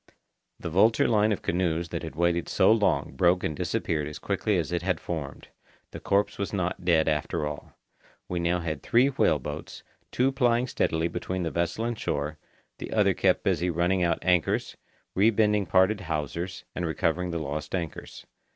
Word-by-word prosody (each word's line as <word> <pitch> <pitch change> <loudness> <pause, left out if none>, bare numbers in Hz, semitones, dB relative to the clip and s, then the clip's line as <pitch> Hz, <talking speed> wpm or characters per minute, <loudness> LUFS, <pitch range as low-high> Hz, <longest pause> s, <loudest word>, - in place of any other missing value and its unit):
The 85 - -5
vulture 110 +6 +4
line 110 -1 +3
of 105 - -2
canoes 85 -1 0
that - - -4
had - - -7
waited 85 +1 +1
so 95 - +4
long 110 -2 +2
broke 90 +5 +3
and 75 - -1
disappeared 75 0 -1
as 75 - -7
quickly 105 -3 0
as 85 -2 -2
it 90 -1 -1
had 90 +1 -1
formed. 80 -5 -6 0.4
The - - -7
corpse 100 +1 0
was 100 - -2
not 90 -2 -2
dead 80 -3 +3
after 75 -1 -1
all. 75 0 -7 0.5
We 90 - -2
now 85 +1 0
had 80 -4 -4
three 125 +4 +3
whale 135 - +2
boats, - - -7 0.3
two 130 +2 +2
plying 125 -2 +2
steadily 80 -9 0
between 90 +2 -3
the 80 - -2
vessel 85 +6 -1
and 120 -2 -3
shore, 75 +1 -3 0.4
the - - -6
other - - +3
kept - - +2
busy 90 - +1
running 90 +2 +1
out 85 -2 +2
anchors, 90 -3 +1 0.4
rebending 105 0 +3
parted 95 +2 +3
hawsers, 85 +3 -4
and 90 - -3
recovering 85 +2 0
the 85 - -2
lost 75 +2 -4
anchors. 85 -4 -6
90 Hz, 180 wpm, -27 LUFS, 80-100 Hz, 0.5 s, vulture